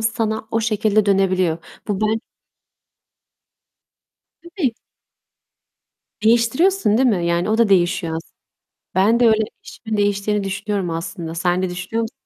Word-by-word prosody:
sana 220 -1 -1
o 225 - +1
şekilde 215 -1 +1
dönebiliyor. 185 -4 +2 0.3
Bu 200 -1 -1
ben 220 +1 +1 2.2
Tabii. 340 - -2 1.5
Değiştiriyorsun, 235 - +3
değil 260 -1 +4
mi? 180 -5 0
Yani, 170 +3 0
o 220 - +2
da 230 -3 +3
değişiyor 175 -3 +2
as 165 - -3 0.7
Ben 215 +5 +3
de 240 - +5
öyle, 220 0 +4 0.2
eşimin 220 -2 -6
değiştiğini 205 0 0
düşünüyorum 195 -1 -2
aslında. 165 0 -5
Sen 175 +2 0
de 185 - -1
düşünüyor 180 +6 -3
musun? 225 +2 -4
210 Hz, 125 wpm, -20 LUFS, 185-225 Hz, 2.2 s, de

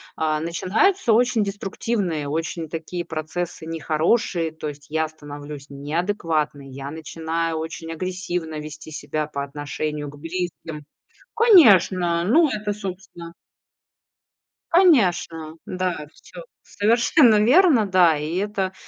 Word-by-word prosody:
а, 155 -1 0
начинаются 220 - +1
очень 240 -1 +3
деструктивные, 195 -5 -2
очень 160 +2 -3
такие 170 +2 -5
процессы 160 +1 -5
нехорошие. 165 +2 0
То 155 -1 -6
есть 145 0 -11
я 160 +1 0
становлюсь 145 -2 -10
неадекватной, 155 -1 -2
я 135 +1 -7
начинаю 160 +1 -3
очень 165 +1 -6
агрессивно 175 -2 -4
вести 155 +1 -9
себя 155 0 -3
по 140 -2 -4
отношению 145 +1 -4
к 145 - -12
близким. 165 -2 -5 0.5
Конечно, 190 - +5
ну, 310 - +5
это, 210 -2 -2
собственно 185 -4 -8 1.4
конечно, 180 - +3
да. 180 -5 -3
Всё - - -12 0.2
совершенно 230 +2 +3
верно. 265 - +5
Да. 180 -5 +4
И 155 +3 -4
это, 195 -1 -1
165 Hz, 110 wpm, -23 LUFS, 155-200 Hz, 1.4 s, Конечно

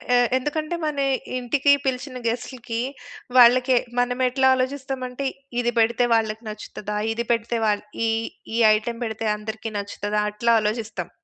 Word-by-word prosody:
ఎ - - +6 0.2
ఎందుకంటే 305 +5 -2
మన 300 -2 -1 0.4
ఇంటికి 275 +3 +2
పిలిచిన 255 0 -2
గెస్టులకి, 240 0 -3 0.6
వాళ్ళకి 250 +1 +7 0.2
మనమెట్లా 255 +2 +2
ఆలోచిస్తామంటే 260 0 -3 0.3
ఇది 240 0 +1
బెడితే 235 +2 +3
వాళ్ళకి 220 0 +1
నచ్చుతదా? 210 0 -6
ఇది 235 +1 -2
పెడితే 230 0 0
వాల్ 210 -1 +1 0.2
ఈ - - +2 0.5
ఈ - - +1 0.2
ఐటెమ్ 230 +2 -4
బెడితే 220 0 -3
అందరికి 220 +1 -6
నచ్చుతదా? 205 +1 -2
అట్లా 230 +2 +2
ఆలోచిస్తాం. 215 -4 -3
235 Hz, 130 wpm, -23 LUFS, 220-255 Hz, 0.6 s, వాళ్ళకి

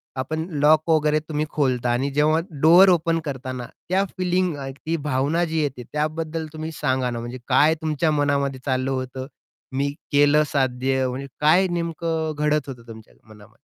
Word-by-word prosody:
आपण 155 +5 -3 0.2
लॉक 155 +2 +4
वगैरे 155 -1 +3
तुम्ही 155 0 -1
खोलता 125 -4 0
आणि 130 +4 0
जेव्हा 155 +2 +3 0.2
डोर 175 +5 +7
ओपन 165 -1 +2
करताना, 130 -3 -5 0.2
त्या 190 +2 +2
फीलिंग, 180 -2 0 0.3
ती 165 +1 0
भावना 145 +6 +1
जी 160 -1 -1
येते, 135 -4 -3
त्याबद्दल 155 +1 -2
तुम्ही 155 +1 -5
सांगा 130 -4 -1
ना. 120 -1 -4
म्हणजे 120 +2 -6
काय 150 +4 +4
तुमच्या 155 0 0
मनामध्ये 140 -2 0
चाललं 130 0 0
होतं? 130 0 -4 0.5
"मी 140 +1 +1 0.2
केलं 145 +1 +5
साध्य." 130 -1 0
म्हणजे 135 +2 -5
काय 175 +5 +5
नेमकं 165 -2 -2
घडत 150 -1 +1
होतं 120 -3 -10
तुमच्या 110 -1 -12
मनामध्ये? 105 -1 -16
150 Hz, 160 wpm, -23 LUFS, 130-160 Hz, 0.5 s, डोर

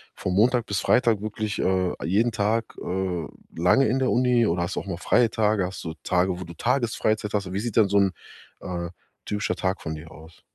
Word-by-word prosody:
von 90 - -3
Montag 120 +3 +3
bis 100 - -1
Freitag 115 -4 +3
wirklich, 110 -1 -3
äh, 95 -1 +1
jeden 110 +7 +2
Tag, 110 +2 -1
äh, 90 -3 -2 0.3
lange 90 +11 +4
in 130 +4 +1
der 130 - +1
Uni 120 0 +3
oder 85 -1 0
hast 90 - -4
du - - 0
auch - - -12
mal 85 - -3
freie 115 +6 +3
Tage? 105 -2 +1
Hast 95 +1 -6
du 80 -2 -4
Tage, 90 0 +1
wo - - -5
du 85 - -10
Tagesfreizeit 115 -3 0
hast? 100 -3 -2
Wie 100 - -1
sieht 115 -1 -4
denn 105 -3 +6
so 100 - +2
'n, 95 -1 +3 0.5
äh, 85 -2 -4 0.4
typischer 105 -1 -1
Tag 95 0 -1
von 80 - -4
dir 80 +1 -10
aus? 80 +1 -15
100 Hz, 215 wpm, -25 LUFS, 90-110 Hz, 0.5 s, denn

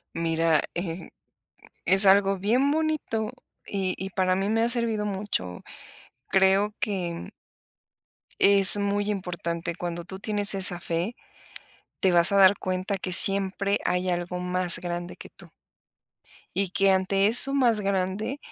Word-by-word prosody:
Mira, 165 -1 0
eh, 170 -1 -6 0.8
es 190 +3 +5
algo 195 0 +3
bien 240 +9 0
bonito 305 -9 -3 0.3
y 190 -2 -3
y 190 0 -6
para 185 0 -1
mí 195 +2 -2
me 225 +1 0
ha 235 - 0
servido 230 -3 -2
mucho, 190 - -5 0.7
creo 195 +2 +1
que, 185 -5 -3
mm 170 - -9 1.1
es 200 0 +8
muy 205 0 -2
importante, 170 -3 -5
cuando 175 0 -6
tú 190 +2 -11
tienes 205 0 +1
esa 185 -2 +4
fe, 175 +7 -4 0.9
te 190 - +2
vas 175 +2 +3
a 200 - +1
dar 195 +1 +5
cuenta 185 +1 -4
que 185 -1 -6
siempre 195 +2 +4
hay 180 0 -1
algo 175 +1 -4
más 180 -1 0
grande 175 0 -6
que - - -12
tú. - - -18 1.1
Y 200 - -1
que 195 +1 +1
ante 195 +1 +1
eso 245 +5 +4
más 240 -6 +1
grande 195 +6 -3
195 Hz, 145 wpm, -24 LUFS, 180-205 Hz, 1.1 s, es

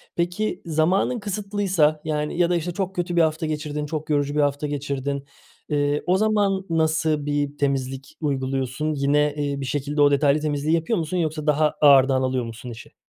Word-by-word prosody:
Peki, 175 +5 -1
zamanın 170 +9 +1
kısıtlıysa, 195 -6 0
yani, 150 +1 -2
ya 175 0 +3
da 175 - +2
işte 170 +1 -2
çok 190 0 -3
kötü 175 0 -2
bir 170 - +5
hafta 160 0 +1
geçirdin, 150 -1 -3
çok 155 0 -5
yorucu 145 0 0
bir - - +1
hafta 145 +1 0
geçirdin, 140 -1 -3 0.5
ııı, 145 0 +1
o 185 +1 +3
zaman 205 -3 +1
nasıl 160 -2 +1
bir 145 0 -1
temizlik 135 +1 -2
uyguluyorsun? 135 +1 -1
Yine, 145 +1 +2
eee, 140 -1 -2
bir - - -3
şekilde 145 +3 -1
o 145 0 +6
detaylı 140 +1 +3
temizliği 150 +1 0
yapıyor 170 +5 0
musun 165 +3 -2
yoksa 155 -2 -2
daha 150 +1 +3
ağırdan 135 -2 +6
alıyor 130 -2 -1
musun 115 +2 -8
işi? 115 -1 -11
150 Hz, 180 wpm, -23 LUFS, 140-165 Hz, 0.5 s, o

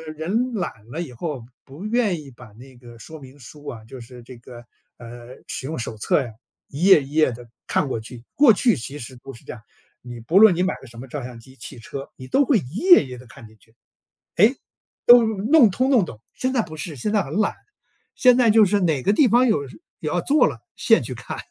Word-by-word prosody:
人 220 +11 -2
懒 175 - -5
了 160 +5 -4
以 160 -7 -7
后 135 0 -6 0.2
不 145 +9 -11
愿 215 -8 0
意 140 - -13
把 125 -1 -15
那 125 +3 -16
个 120 -1 -15
说 160 +8 -11
明 135 0 -15
书 145 +4 -14
啊 110 -2 -8
就 130 +3 -11
是 120 +1 -12
这 125 0 -13
个， 120 0 -13 0.3
呃， 120 0 -12 0.2
使 - - -5
用 160 -1 -5
手 115 -1 -5
册 105 - +1
呀， 120 -4 -7 0.4
一 145 +5 -6
页 190 -6 +6
一 135 - -12
页 155 -3 +2
地 120 0 -11 0.2
看 145 - 0
过 115 - -3
去， 115 +2 -11
过 275 -6 +6
去 230 - +2
其 135 +5 -7
实 125 +2 -9
不 135 - -9
是 115 - -16
这 - - -9
样， 120 - -13 0.4
你 120 -1 -10
不 160 +12 0
论 215 -4 +7
你 180 - -1
买 185 - -1
的 135 - -13
什 115 0 -13
么 130 - -9
照 135 0 -6
相 125 -2 -9
机、 130 +3 -17
汽 125 +1 -10
车， 135 +5 -9
你 130 - -11
都 275 - +2
会 255 -4 +3
一 135 +1 -10
页 360 - +6
一 - - -12
页 125 - -8
地 125 - -14
看 110 +1 -14
进 110 - -21
去， 110 - -27 0.6
诶， 220 +9 +4 0.5
都 240 -1 +8
弄 220 +4 +3
通 255 +8 0
弄 245 -8 +4
懂。 115 -8 -12
现 255 0 -2
在 245 -4 +1
不 155 -4 -10
是， 155 +1 -6
现 145 - -3
在 210 - +1
很 - - -9
懒， 210 - 0 0.6
现 250 -1 +4
在 245 -3 +3
就 220 0 +6
是 205 +1 +1
哪 160 -7 0
个 200 - +2
地 275 +5 +4
方 245 +2 +3
有 145 -10 0
是 115 -4 -15 0.2
有 155 - -4
要 175 - 0
做 290 - +3
了， - - -5 0.2
现 - - +3
去 - - -6
看， - - -8
145 Hz, 270 characters per minute, -22 LUFS, -, 0.6 s, 都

